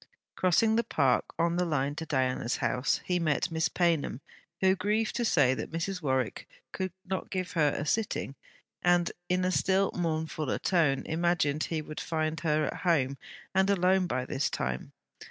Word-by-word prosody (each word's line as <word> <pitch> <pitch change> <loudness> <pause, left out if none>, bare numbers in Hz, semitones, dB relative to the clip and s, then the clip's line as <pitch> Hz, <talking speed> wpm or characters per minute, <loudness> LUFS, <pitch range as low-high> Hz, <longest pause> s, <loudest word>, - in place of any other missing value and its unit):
Crossing 220 +5 +3
the 235 - +2
park 135 - +2
on 170 +1 +1
the 180 - +2
line 145 -4 0
to 160 +2 -6
Diana's 130 -4 0
house, 125 +1 0
he 180 -1 +1
met 155 -3 0
Miss 160 +1 +1
Paynham, 165 -8 +1 0.4
who 190 0 +4
grieved 210 +4 0
to 240 - 0
say 145 - +4
that - - -4
Mrs. 180 +3 -3
Warwick 130 -5 -1 0.2
could 185 -1 -3
not 190 0 -3
give 185 0 -3
her 155 -5 +3
a 145 - -3
sitting; 205 -5 -1 0.5
and 175 -1 +3 0.2
in 180 0 +1
a 185 - +1
still 190 +1 +2
mournfuller 160 -4 -2
tone, 155 -7 +2
imagined 160 -3 +1
he 160 -2 -3
would 155 0 -7
find 155 -1 -2
her 155 -2 +1
at - - -4
home, 140 -6 +1 0.3
and 190 +1 +3
alone 185 -1 +3
by 130 -4 -2
this 135 +2 -1
time. 65 0 -3
165 Hz, 170 wpm, -29 LUFS, 145-185 Hz, 0.5 s, who